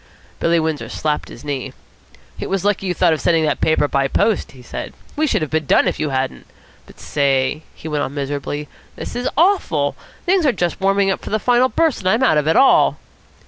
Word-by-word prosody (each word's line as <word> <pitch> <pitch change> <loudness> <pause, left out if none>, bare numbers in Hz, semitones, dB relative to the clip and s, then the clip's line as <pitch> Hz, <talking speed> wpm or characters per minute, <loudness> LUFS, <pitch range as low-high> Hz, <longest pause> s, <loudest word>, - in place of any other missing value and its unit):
Billy 170 0 +2
Windsor 160 -2 -2
slapped 150 -1 -2
his - - -12
knee. 140 -3 -4 0.7
"It - - -4
was 195 0 -1
lucky 200 -1 +1
you 180 - 0
thought 175 -3 +3
of 155 - -3
sending 165 -2 +2
that 150 - -1
paper 155 -2 +2
by 140 -1 +1
post," 215 +9 0
he 125 -2 -14
said. - - -6 0.2
"We 310 +1 +1
should 210 - +1
have 155 - -5
been 155 -2 -1
done - - +4
if - - -1
you 155 - -1
hadn't. 130 -1 -3 0.4
But, - - -17
say," 135 +1 0
he - - -9
went 150 -2 -1
on 140 - -5
miserably, 145 +1 -3 0.3
"this - - -7
is 245 +1 -1
awful. 300 - +2 0.3
Things 365 0 +3
are 285 - +4
just 175 -4 -2
warming 195 0 +2
up - - -3
for - - -7
the 215 - +1
final 245 +3 +3
burst, 325 -2 +1
and 185 - 0
I'm 225 +6 +2
out 155 -12 +4
of 150 - -2
it 160 - +3
all." 270 - +5
160 Hz, 225 wpm, -19 LUFS, 145-210 Hz, 0.7 s, all